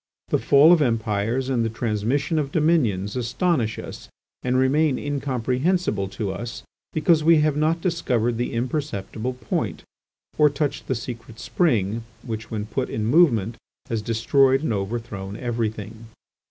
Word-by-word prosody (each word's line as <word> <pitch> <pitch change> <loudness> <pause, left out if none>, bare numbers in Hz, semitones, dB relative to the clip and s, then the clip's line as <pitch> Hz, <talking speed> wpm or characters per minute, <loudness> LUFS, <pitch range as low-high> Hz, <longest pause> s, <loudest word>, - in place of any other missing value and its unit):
The - - +2
fall 145 +5 +6
of 170 - +3
Empires 115 0 0
and 125 -3 +1
the 115 - 0
transmission 120 +7 -1
of 140 -2 -2
dominions 125 - +1
astonish 125 - 0
us - - -9 0.3
and 125 0 0
remain 135 +2 +3
incomprehensible 135 - -1
to 100 0 -4
us, 115 +5 -6 0.3
because 155 0 +3
we 160 -1 +5
have 150 -1 +2
not 160 +3 +1
discovered 125 -10 0
the 120 - -2
imperceptible 125 -2 -3
point, 125 -3 -3 0.6
or 150 -1 +7
touched 145 0 -3
the 130 - 0
secret 115 -1 -7
spring 115 - 0 0.2
which 110 -2 -5
when 105 -2 -3
put 130 +4 -3
in 110 - -2
movement 115 - +3 0.3
has 115 -2 -1
destroyed 130 +5 +2
and 120 - 0
overthrown 100 -1 -4
everything. 110 -2 -4
120 Hz, 140 wpm, -23 LUFS, 110-145 Hz, 0.6 s, or